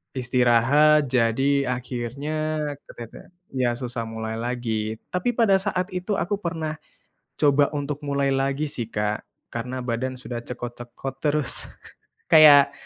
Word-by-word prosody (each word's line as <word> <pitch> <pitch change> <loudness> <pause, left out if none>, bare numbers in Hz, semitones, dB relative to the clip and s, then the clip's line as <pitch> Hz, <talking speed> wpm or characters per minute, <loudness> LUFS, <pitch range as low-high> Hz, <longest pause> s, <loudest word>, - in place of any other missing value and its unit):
istirahat 130 +4 +4
jadi 135 +3 +2
akhirnya 140 +5 -3 0.2
ketete 115 -1 -11 0.3
ya 125 -2 +2
susah 120 -1 -4
mulai 110 0 -4
lagi. 115 -3 -2 0.2
Tapi 180 +7 0
pada 225 -5 +4
saat 185 -2 -1
itu 185 +3 -2
aku 195 +2 0
pernah 160 -4 -4 0.6
coba 145 -1 +4
untuk 145 0 -3
mulai 140 -1 0
lagi 135 +2 0
sih, 120 -6 -5
Kak, 105 -1 -2 0.3
karena 125 +2 -4
badan 125 +2 -2
sudah 125 -1 -6
cekot-cekot 120 +2 -7
terus. 150 -2 0 0.6
Kayak, 145 -3 +8
135 Hz, 120 wpm, -24 LUFS, 120-150 Hz, 0.6 s, Kayak